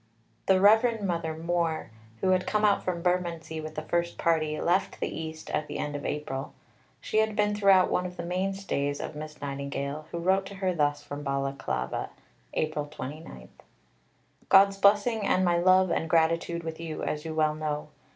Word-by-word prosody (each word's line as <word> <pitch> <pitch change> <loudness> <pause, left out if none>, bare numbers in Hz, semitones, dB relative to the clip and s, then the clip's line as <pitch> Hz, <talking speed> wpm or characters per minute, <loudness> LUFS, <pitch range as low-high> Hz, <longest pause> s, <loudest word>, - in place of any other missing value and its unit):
The 190 -1 +5
Reverend 220 +2 +4
Mother 165 -3 -2
(Moore), 165 -4 -1 0.3
who 185 - +3
had 185 0 +1
come 215 0 +2
out 205 -1 +3
from 170 -2 -2
Bermondsey 170 -3 -1
with 155 0 -7
the 155 - -4
first 170 +1 -1
party, 155 -2 +1
left 180 +3 0
the - - -1
East 160 -1 -6
at 150 - -1
the - - -5
end 150 0 -3
of 145 - -4
April. 140 -2 -4 0.4
She 215 - 0
had 220 -1 +1
been 210 -1 +2
throughout 195 -3 +4
one 180 - +1
of 180 - -11
the 170 - -4
mainstays 180 -6 -2
of - - -5
Miss 150 0 -8
Nightingale, 140 +1 -4
who - - -4
wrote 190 +3 +1
to 200 - -9
her 190 -1 0
thus 145 -3 0
from 145 +1 -6
Balaclava 135 - -2 0.5
(April 155 -1 -1
29): 145 - -8 1.0
"God's 195 0 +6
blessing 205 +3 +3
and 185 -1 +3
my 175 -1 +3
love 185 0 +4
and 160 - -1
gratitude 165 +1 +1
with 160 -1 -6
you, 165 -2 -5
as 150 0 -2
you 160 -1 -5
well 155 -1 +2
know. 150 -1 -3
165 Hz, 180 wpm, -28 LUFS, 150-185 Hz, 1.0 s, God's